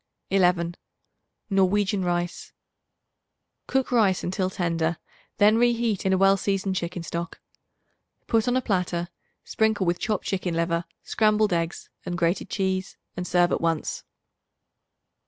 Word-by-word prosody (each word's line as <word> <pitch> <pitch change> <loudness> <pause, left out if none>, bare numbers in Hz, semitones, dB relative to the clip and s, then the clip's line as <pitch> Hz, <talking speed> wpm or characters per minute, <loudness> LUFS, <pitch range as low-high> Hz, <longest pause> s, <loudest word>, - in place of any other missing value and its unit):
11. 175 -3 +2 0.8
Norwegian 195 +1 +2
Rice. 175 0 -2 1.1
Cook 265 -1 0
rice 210 -6 +3
until 185 +1 -1
tender; 170 -3 -1 0.4
then 210 +2 +5
reheat 235 -5 +1
in - - +2
a - - +3
well 195 +1 +5
seasoned 195 -1 -1
chicken 175 -1 -3
stock. 170 +2 -5 0.9
Put 225 -1 +1
on 245 +1 +2
a 260 - -1
platter; 180 -4 -1 0.3
sprinkle 220 -3 +1
with 175 0 0
chopped 215 -2 -2
chicken 185 -3 -2
liver, 170 0 0 0.2
scrambled 215 -2 +2
eggs 170 0 -2 0.2
and 175 - -4
grated 170 +1 0
cheese 190 -1 -2 0.2
and 180 0 -4
serve 175 0 +3
at - - 0
once. 165 -2 -1
185 Hz, 130 wpm, -25 LUFS, 175-205 Hz, 1.1 s, then